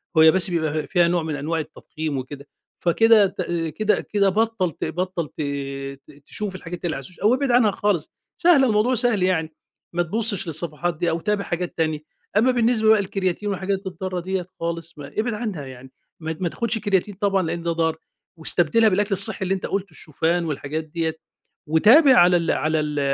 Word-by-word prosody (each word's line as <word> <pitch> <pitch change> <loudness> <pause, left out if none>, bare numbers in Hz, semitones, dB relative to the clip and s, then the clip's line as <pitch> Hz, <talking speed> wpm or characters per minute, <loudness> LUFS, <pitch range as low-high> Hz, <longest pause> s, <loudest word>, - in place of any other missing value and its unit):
وهي 160 0 +7
بس 190 +2 +2
بيبقى 155 -3 -1
فيها 175 0 +3
نوع 170 -1 0
من 155 -2 -3
أنواع 155 +4 -2
التضخيم 155 -1 -5
وكده، 140 +2 -7 0.3
فكده 215 +4 +5
ت 190 - -6 0.4
كده 215 0 +1
كده 200 -2 +1
بطَّل 215 -3 0
ت - - -5
بطَّل 175 0 -3
ت 155 - -8 0.7
ت 145 -1 -20
تشوف 205 -3 -4
الحاجات 175 -1 -7
اللي 160 -3 -1
على - - -4
السوشي 175 +7 -13
أو 215 +4 +5
ابعد 265 0 0
عنها 240 -3 +4
خالص، 195 -6 -1 0.3
سهلة 335 -7 +5
الموضوع 225 +3 +2
سهل 235 -5 +2
يعني، 160 -4 0 0.4
ما 175 0 +1
تبُصش 205 +1 0
للصفحات 165 +1 -3
دي 170 - 0
أو 165 - -1
تابع 210 +3 -1
حاجات 175 0 -4
تانية، 155 -2 0 0.4
أما 245 +4 +4
بالنسبة 235 -2 +2
بقى 220 -1 +6
للكرياتين 195 0 -2
والحاجات 195 0 -2
الضارة 185 0 -4
ديّة 185 +1 -3
خالص 165 -1 -5
ما 145 -1 -8
ابعد 230 +2 0
عنها 210 -10 -4
يعني، 130 0 -11 0.3
ما 160 -1 -5
ما 180 -2 -1
تاخدش 230 +4 -1
كرياتين 205 -1 0
طبعًا 195 -1 +1
لأن 170 0 -3
ده 170 - 0
ضار، 160 -1 0 0.4
واستبدلها 175 +7 +2
بالأكل 205 +2 0
الصحي 195 +1 0
اللي 190 0 0
أنت 190 - -5
قُلته 195 0 -3
الشوفان 165 +3 -1
والحاجات 155 +1 -3
ديّة، 160 0 -3 0.5
وتابع 235 - +6
على 175 -2 +6
ال 170 -1 0
على 155 +1 0
ال 150 -1 -2
180 Hz, 190 wpm, -22 LUFS, 160-210 Hz, 0.7 s, وهي